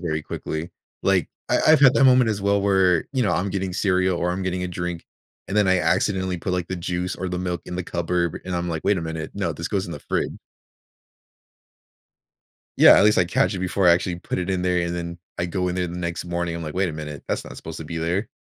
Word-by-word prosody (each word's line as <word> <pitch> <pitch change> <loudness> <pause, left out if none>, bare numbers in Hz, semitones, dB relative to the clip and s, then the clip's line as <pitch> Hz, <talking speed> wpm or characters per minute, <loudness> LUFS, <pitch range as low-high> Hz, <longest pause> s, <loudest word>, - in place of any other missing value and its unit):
very 80 -3 -2
quickly. 80 +2 -5 0.3
Like, 95 -5 +2 0.2
I - - +4
I've 155 -1 +7
had 135 -3 +8
that 135 - +4
moment 125 -3 +5
as 105 -2 -2
well 100 0 +2
where, 95 -4 +3
you 130 - +1
know, 105 - +1
I'm 95 +2 0
getting 95 -1 -3
cereal 95 -2 +1
or 90 - 0
I'm 95 +2 -2
getting 90 0 -2
a 90 - -3
drink, 90 -1 -4 0.4
and 100 - -2
then 105 -3 +4
I 95 -1 +4
accidentally 95 -1 +1
put, 90 - -3
like, 90 -2 -2
the 95 - -3
juice 90 +1 -3
or 95 +1 -4
the 90 - -3
milk 90 -2 -2
in 90 - -5
the 90 - -2
cupboard, 85 -1 -1
and 90 -1 -2
I'm 85 0 -2
like, 80 -1 -4
"Wait 100 0 +3
a 85 - -3
minute. 80 -1 -5
No, 95 -5 -1
this 85 - -5
goes 95 -2 -1
in 85 - -7
the 75 - -7
frid" - - -2 2.5
Yeah, - - +9
at - - +5
least 105 -2 +4
I 90 - +5
catch 130 +5 +1
it - - -3
before 95 +1 0
I - - +8
actually 85 +1 0
put - - -4
it 90 0 -3
in 95 -1 0
there, 90 -1 +1
and 85 - -3
then 85 0 -5 0.2
I 85 - 0
go 90 +1 -1
in 90 - -2
there 90 -1 -1
the 85 +1 -6
next 85 0 -3
morning. 85 -1 -2
I'm 85 - -5
like, 75 0 -6
"Wait 95 0 +1
a - - -4
minute. 75 -2 -7
That's - - -2
not - - -10
supposed - - -8
to - - -7
be 85 - -5
there." 90 +6 -1
90 Hz, 260 wpm, -23 LUFS, 85-95 Hz, 2.5 s, Yeah